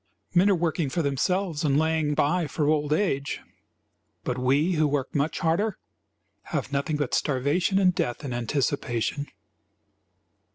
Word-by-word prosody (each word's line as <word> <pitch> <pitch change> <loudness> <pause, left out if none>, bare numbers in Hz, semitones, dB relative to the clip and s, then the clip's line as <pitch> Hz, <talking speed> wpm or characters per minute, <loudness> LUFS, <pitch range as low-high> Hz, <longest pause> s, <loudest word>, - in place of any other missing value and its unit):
Men 185 +3 +5
are 200 - +4
working 165 -3 0
for 170 +5 -1
themselves 165 +4 0
and 140 -2 +2
laying 160 -1 +1
by 165 +4 +1
for 145 +1 -1
old 150 -1 +1
age, 145 -5 0 0.8
but 125 - -1
we, 135 +7 +2
who 155 -3 +2
work 140 -2 -2
much 145 +3 0
harder, 185 +5 +1 0.7
have - - -3
nothing 140 +2 0
but 145 -4 -2
starvation 150 +8 +1
and 185 -2 +4
death 125 -1 -2
in 130 - -3
anticipation. 125 +2 -1
150 Hz, 140 wpm, -26 LUFS, 140-170 Hz, 0.8 s, Men